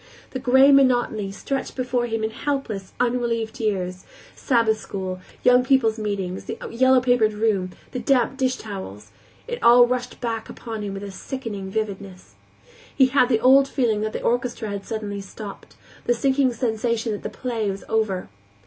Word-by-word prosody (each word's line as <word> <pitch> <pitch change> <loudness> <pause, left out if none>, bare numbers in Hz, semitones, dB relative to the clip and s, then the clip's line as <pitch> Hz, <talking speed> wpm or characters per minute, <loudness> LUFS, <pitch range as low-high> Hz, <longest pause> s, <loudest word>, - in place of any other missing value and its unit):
The 260 - -4
gray 265 +3 +6
monotony 245 -7 +3
stretched 270 +7 -4
before 250 -1 -1
him 225 -1 -2
in 220 - -1
hopeless, 225 -8 -3
unrelieved 235 -2 -1
years; 185 -4 -2 0.3
Sabbath 230 -4 +2
school, 185 -2 -5 0.2
Young 250 0 +6
People's 250 -4 +2
Meeting, 200 -4 -2
the - - -6
yellow 260 +2 +4
papered 245 -4 +3
room, 210 -4 0 0.2
the 250 - -3
damp 250 +1 +2
dishtowels; 205 - -4 0.4
it 480 -1 -5
all 240 +1 +8
rushed 250 0 -3
back 225 -2 -3
upon 225 -3 -6
him 200 -1 -4
with 195 - -6
a 200 - -6
sickening 205 -3 -6
vividness. 195 -3 -5 0.6
He 265 -2 +5
had 255 -1 +3
the 230 -3 +3
old 270 +2 +6
feeling 235 -6 0
that 215 0 -2
the - - -4
orchestra 240 -2 -1
had 200 -1 -5
suddenly 210 -3 -4
stopped, 200 +1 -10 0.3
the 240 - +3
sinking 265 +1 +2
sensation 230 -1 -1
that 205 - -4
the - - -4
play 230 -5 -3
was 195 0 -5
over. 215 -4 0
225 Hz, 165 wpm, -23 LUFS, 205-250 Hz, 0.6 s, all